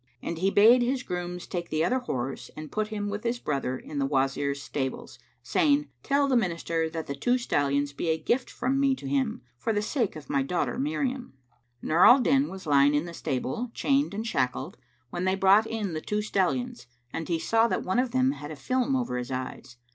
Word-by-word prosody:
And 170 Hz, -, -4 dB
he 190 Hz, +2 st, +2 dB
bade 225 Hz, +5 st, +6 dB
his 250 Hz, +1 st, 0 dB
grooms 180 Hz, -2 st, -4 dB
take 175 Hz, -1 st, -4 dB
the 155 Hz, +1 st, +1 dB
other 255 Hz, +5 st, +1 dB
horse 135 Hz, -, -4 dB
and 155 Hz, 0 st, -7 dB
put 215 Hz, 0 st, -1 dB
him 210 Hz, -1 st, -3 dB
with 205 Hz, +1 st, -4 dB
his 240 Hz, +1 st, 0 dB
brother 135 Hz, -, -2 dB
in 145 Hz, +2 st, -6 dB
the 135 Hz, -, +1 dB
Wazir's 140 Hz, 0 st, 0 dB
stables, 135 Hz, -2 st, -4 dB, 0.2 s
saying, 295 Hz, -3 st, +2 dB
"Tell 280 Hz, 0 st, +2 dB
the 265 Hz, -, +2 dB
Minister 170 Hz, -6 st, 0 dB
that 160 Hz, -1 st, -5 dB
the 140 Hz, -, -4 dB
two 245 Hz, -, +1 dB
stallions 145 Hz, -, 0 dB
be 165 Hz, -, -2 dB
a 160 Hz, -, +2 dB
gift 245 Hz, +9 st, 0 dB
from 265 Hz, +2 st, -1 dB
me 275 Hz, -1 st, +3 dB
to 140 Hz, -, -11 dB
him, 135 Hz, -1 st, -1 dB, 0.2 s
for 225 Hz, -, -1 dB
the 210 Hz, -1 st, +1 dB
sake 230 Hz, -, -1 dB
of 155 Hz, -2 st, -9 dB
my 140 Hz, -, +1 dB
daughter 175 Hz, -, -1 dB
Miriam." 270 Hz, -, -2 dB, 0.5 s
Nur 165 Hz, +3 st, +3 dB
al 245 Hz, -, +9 dB
Din 270 Hz, +3 st, +3 dB
was 190 Hz, -1 st, -9 dB
lying 145 Hz, -1 st, +4 dB
in 150 Hz, +3 st, +1 dB
the 170 Hz, -, -8 dB
stable, 135 Hz, -, -3 dB
chained 275 Hz, -5 st, +1 dB
and 220 Hz, +2 st, -3 dB
shackled, 130 Hz, -, -1 dB, 0.4 s
when 175 Hz, +1 st, -2 dB
they 190 Hz, 0 st, +2 dB
brought 195 Hz, +3 st, +5 dB
in 210 Hz, -6 st, -3 dB
the 155 Hz, -, -3 dB
two 210 Hz, +4 st, -2 dB
stallions 225 Hz, -, -1 dB, 0.3 s
and 165 Hz, -, -4 dB
he 170 Hz, -, +1 dB
saw 225 Hz, +7 st, +2 dB
that -, -, -1 dB
one 185 Hz, +6 st, 0 dB
of 255 Hz, 0 st, +1 dB
them 260 Hz, +2 st, +2 dB
had 150 Hz, -, -7 dB
a 155 Hz, -, -6 dB
film 255 Hz, -, 0 dB
over 245 Hz, -, -1 dB
his 125 Hz, -, -5 dB
eyes. 130 Hz, -1 st, -6 dB
190 Hz, 215 wpm, -27 LUFS, 145-245 Hz, 0.5 s, al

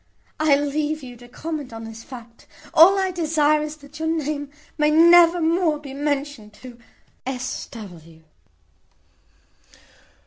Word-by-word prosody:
I 310 Hz, -2 st, +4 dB
leave 295 Hz, +1 st, -2 dB
you 245 Hz, -1 st, -10 dB
to 245 Hz, +1 st, -15 dB
comment 295 Hz, +1 st, -6 dB
on 225 Hz, 0 st, -8 dB
this 225 Hz, 0 st, -10 dB
fact. 235 Hz, -3 st, -13 dB, 0.3 s
All 355 Hz, +5 st, +7 dB
I 380 Hz, -1 st, 0 dB
desire 305 Hz, -3 st, +1 dB
is, 300 Hz, 0 st, -5 dB
that 295 Hz, 0 st, -14 dB
your 320 Hz, -, -2 dB
name 300 Hz, -3 st, -2 dB, 0.3 s
may 300 Hz, -1 st, +2 dB
never 340 Hz, +2 st, +6 dB
more 330 Hz, -1 st, +1 dB
be 285 Hz, -2 st, -10 dB
mentioned 285 Hz, -6 st, -3 dB
to 245 Hz, +2 st, -13 dB, 0.5 s
"S. 255 Hz, -1 st, -4 dB
W." 165 Hz, -7 st, -12 dB
295 Hz, 135 wpm, -22 LUFS, 250-315 Hz, 0.5 s, All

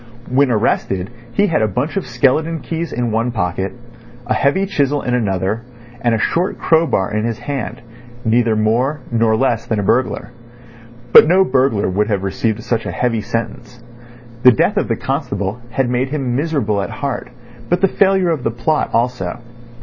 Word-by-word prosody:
When 135 Hz, +1 st, +3 dB
arrested 100 Hz, -4 st, 0 dB, 0.2 s
he 205 Hz, -, +2 dB
had 165 Hz, -, +1 dB
a 110 Hz, -, +3 dB
bunch 125 Hz, -, -2 dB
of 195 Hz, -8 st, -2 dB
skeleton 140 Hz, +7 st, +1 dB
keys 165 Hz, -1 st, -4 dB
in 120 Hz, -1 st, -1 dB
one 115 Hz, +2 st, 0 dB
pocket, 95 Hz, -3 st, -2 dB, 0.5 s
a 120 Hz, -, 0 dB
heavy 165 Hz, +8 st, +2 dB
chisel 145 Hz, -6 st, 0 dB
in 125 Hz, -, -1 dB
another, 100 Hz, -2 st, 0 dB, 0.4 s
and 120 Hz, -1 st, +2 dB
a -, -, -2 dB
short 175 Hz, -, 0 dB
crowbar 160 Hz, -, +1 dB
in 105 Hz, -, 0 dB
his 115 Hz, -1 st, -2 dB
hand: 125 Hz, 0 st, -5 dB, 0.4 s
neither 115 Hz, 0 st, +2 dB
more 120 Hz, +7 st, +1 dB
nor 115 Hz, -1 st, +2 dB
less 120 Hz, -2 st, 0 dB
than 110 Hz, -, 0 dB
a -, -, -1 dB
burglar. 125 Hz, +3 st, 0 dB, 0.8 s
But -, -, +10 dB
no 185 Hz, +3 st, +5 dB
burglar 130 Hz, -, +1 dB
would 100 Hz, +3 st, 0 dB
have 100 Hz, -3 st, -1 dB
received 105 Hz, +3 st, -1 dB
such 115 Hz, -2 st, -1 dB
a -, -, -2 dB
heavy 115 Hz, -3 st, 0 dB
sentence. 115 Hz, +1 st, -5 dB, 0.6 s
The 125 Hz, -, +8 dB
death 115 Hz, -, +1 dB
of -, -, +1 dB
the -, -, 0 dB
constable 100 Hz, +4 st, -3 dB
had 125 Hz, +2 st, 0 dB
made 125 Hz, +2 st, 0 dB
him 135 Hz, -4 st, -2 dB
miserable 135 Hz, -9 st, 0 dB
at 100 Hz, -, -4 dB
heart, 140 Hz, -3 st, -4 dB, 0.4 s
but 175 Hz, +1 st, +1 dB
the 195 Hz, -, +5 dB
failure 190 Hz, -2 st, +2 dB
of 155 Hz, -5 st, -1 dB
the 115 Hz, -, 0 dB
plot 120 Hz, +7 st, 0 dB
also. 115 Hz, -6 st, -1 dB
120 Hz, 180 wpm, -18 LUFS, 110-140 Hz, 0.8 s, But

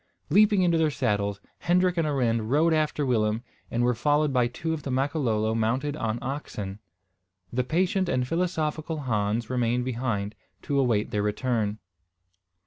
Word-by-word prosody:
Leaping 205 Hz, +1 st, +5 dB
into 170 Hz, -2 st, +3 dB
their 160 Hz, -1 st, +3 dB
saddles 100 Hz, -7 st, -1 dB, 0.2 s
Hendrik 180 Hz, +1 st, +2 dB
and 165 Hz, -3 st, +1 dB
Arend 115 Hz, -6 st, 0 dB
rode 160 Hz, +5 st, +3 dB
after 150 Hz, -2 st, +1 dB
Willem, 110 Hz, -2 st, +1 dB, 0.3 s
and 120 Hz, +1 st, 0 dB
were 125 Hz, 0 st, +3 dB
followed 145 Hz, +4 st, +1 dB
by 125 Hz, -2 st, +3 dB
two 160 Hz, +7 st, -3 dB
of 160 Hz, -, -4 dB
the 140 Hz, -, -5 dB
Makololo 130 Hz, -5 st, 0 dB
mounted 125 Hz, +6 st, 0 dB
on 115 Hz, -6 st, -2 dB
oxen. 105 Hz, -7 st, -5 dB, 0.7 s
The 125 Hz, +1 st, +1 dB
patient 185 Hz, -, +1 dB
and 125 Hz, -6 st, 0 dB
philosophical 160 Hz, -2 st, -1 dB
Hans 110 Hz, -2 st, 0 dB
remained 125 Hz, 0 st, 0 dB
behind, 115 Hz, -5 st, -2 dB, 0.3 s
to 140 Hz, -1 st, 0 dB
await 115 Hz, -6 st, +1 dB
their 105 Hz, -, 0 dB
return. 105 Hz, 0 st, -1 dB
130 Hz, 150 wpm, -26 LUFS, 115-155 Hz, 0.7 s, Leaping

